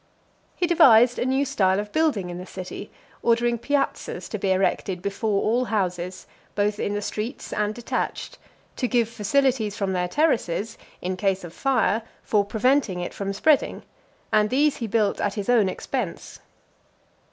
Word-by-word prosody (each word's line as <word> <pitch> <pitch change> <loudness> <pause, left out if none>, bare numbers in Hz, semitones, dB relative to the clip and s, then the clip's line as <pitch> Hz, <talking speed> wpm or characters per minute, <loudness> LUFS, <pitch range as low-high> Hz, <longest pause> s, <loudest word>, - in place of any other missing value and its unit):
XVI. - - -38 0.5
He 355 - +1
devised 245 -8 +6
a 245 - 0
new 265 +2 +2
style 195 -8 +2
of 210 0 -5
building 275 - +1
in 175 - -6
the 180 - -7
city, 185 +2 -7 0.3
ordering 235 0 +2
piazzas 275 -9 -2
to 215 - -4
be 195 0 0
erected 190 0 0
before 200 +2 -1
all 240 +4 +1
houses, 185 -4 -2 0.3
both 205 0 0
in 205 - -1
the 205 - -2
streets 225 +6 -5
and 210 0 -1
detached, 240 -1 -4 0.4
to 250 - 0
give 235 -2 +2
facilities 230 -1 0
from 195 -2 -1
their 180 -1 0
terraces, 225 - 0 0.3
in 185 +1 -2
case 195 0 0
of 170 -1 -9
fire, 250 -4 +1 0.2
for 210 -2 +2
preventing 220 -1 +1
it 175 - -4
from 195 -1 -3
spreading; 285 +8 +2 0.5
and 210 0 +4
these 285 +4 +2
he 230 - -3
built 215 -1 +1
at 205 - -1
his 205 0 -4
own 225 -6 +4
expense. - - -5
210 Hz, 165 wpm, -24 LUFS, 195-245 Hz, 0.5 s, devised